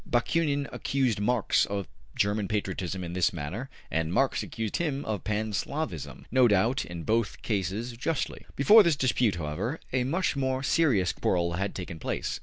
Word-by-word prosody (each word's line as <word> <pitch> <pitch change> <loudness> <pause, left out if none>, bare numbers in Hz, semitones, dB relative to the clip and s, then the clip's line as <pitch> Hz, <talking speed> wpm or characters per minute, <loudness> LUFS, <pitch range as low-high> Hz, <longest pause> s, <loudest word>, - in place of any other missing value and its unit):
Bakunin 140 +3 +1
accused 130 -6 0
Mars 115 +1 +2
of 100 -2 -3 0.3
German 100 0 +1
patriotism 95 -3 -2
in 85 0 -5
this 90 +3 +2
matter, 95 - -5 0.2
and 80 +1 0
Marx 135 +8 +2
accused 110 -3 -3
him 145 -5 -2
of 105 -4 -3
Pan 105 0 -1
Slavism, 140 - -4
no 130 0 +6
doubt 115 +6 +2
in 85 -1 -7
both 110 +5 0
cases 105 +3 -1
justly. 130 +6 -3
Before 210 +11 +8
this 170 -6 +3
dispute, 125 -6 +2
however, 85 - -3
a 125 -1 +2
much 165 +7 0
more 130 -1 -1
serious 130 - +3
quarrel 85 -2 0
had 100 +3 -2
taken 85 -3 -6
place. - - -3
110 Hz, 165 wpm, -28 LUFS, 95-135 Hz, 0.3 s, Before